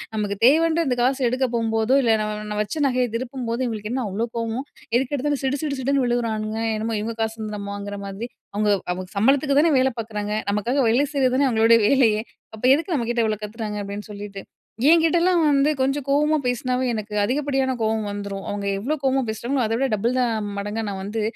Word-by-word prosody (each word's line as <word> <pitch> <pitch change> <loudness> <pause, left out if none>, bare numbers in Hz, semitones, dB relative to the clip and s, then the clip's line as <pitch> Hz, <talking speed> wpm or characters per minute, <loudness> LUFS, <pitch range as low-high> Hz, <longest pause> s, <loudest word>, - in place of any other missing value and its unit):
நமக்கு 205 -2 -1
தேவைன்ற 325 +4 +4
இந்த 250 -2 0
காசு 265 +2 +1
எடுக்க 255 +2 0
போம்போதோ, 225 +2 +2
இல்ல, 225 -2 +4
ந - - -1 0.3
நம்ம 210 - -3
வச்ச 300 +9 -4
நகைய 250 -1 +1
திருப்பும்போது, 245 -1 -4
இவங்களுக்கு 215 -2 -4
என்ன 260 0 -1
அவ்ளோ 215 +5 -2
கோவம்! 230 +3 -2 0.3
எதுக்கெடுத்தாலும், 280 +2 -1
சிடு 270 +1 0
சிடு 285 -2 -2
சிடுன்னு 275 0 +1
விழுகிறானுங்க, 220 -3 -1 0.2
என்னமோ 220 +1 -2
இவங்க 225 +2 -4
காசு 220 0 -3
வந்து 215 -1 -4
நம்ம 200 0 -6
வாங்குற 205 0 -6
மாதிரி, 195 +4 -5 0.3
அவங்க 210 0 +1 0.2
அவங்க 185 +1 -6
சம்பளத்துக்கு 275 +6 +3
தான 325 -1 +3
வேலை 265 +1 +2
பார்க்குறாங்க? 210 -2 -4 0.2
நமக்காக 230 +7 0
வேலை 250 +6 +3
செய்றது 260 -3 +2
தானே 275 +1 +3
அவங்களுடைய 230 0 +5
வேலையே, 225 -5 +3 0.3
அப்ப 220 - -14
எதுக்கு 330 +3 -2
நம்ம 235 -5 -1
கிட்ட 235 -1 +1
இவ்ளோ 215 -1 -1
கத்துறாங்க?" 210 0 -5
அப்படின்னு 200 +2 -6
சொல்லிட்டு 200 -1 -7 0.5
என்கிட்டலாம் 340 +2 +4
வந்து 285 0 +3
கொஞ்சம் 270 +1 0
கோவமா 300 +2 +3
பேசினாவே 250 +1 0
எனக்கு 215 -1 -5
அதிகப்படியான 270 +2 0
கோவம் 220 -1 0
வந்துரும், 200 -1 -5
அவங்க 205 0 -3
எவ்வளோ 270 +10 -1
கோவமா 270 0 +2
பேசுறாங்களோ, 245 +4 -1
அதவிட 230 +5 0
டபுள் 230 +4 0
த, - - +3 0.4
மடங்கா 205 +3 -3
நான் 195 -1 -5
வந்து, 210 +3 -3
235 Hz, 190 wpm, -23 LUFS, 215-270 Hz, 0.5 s, அவங்களுடைய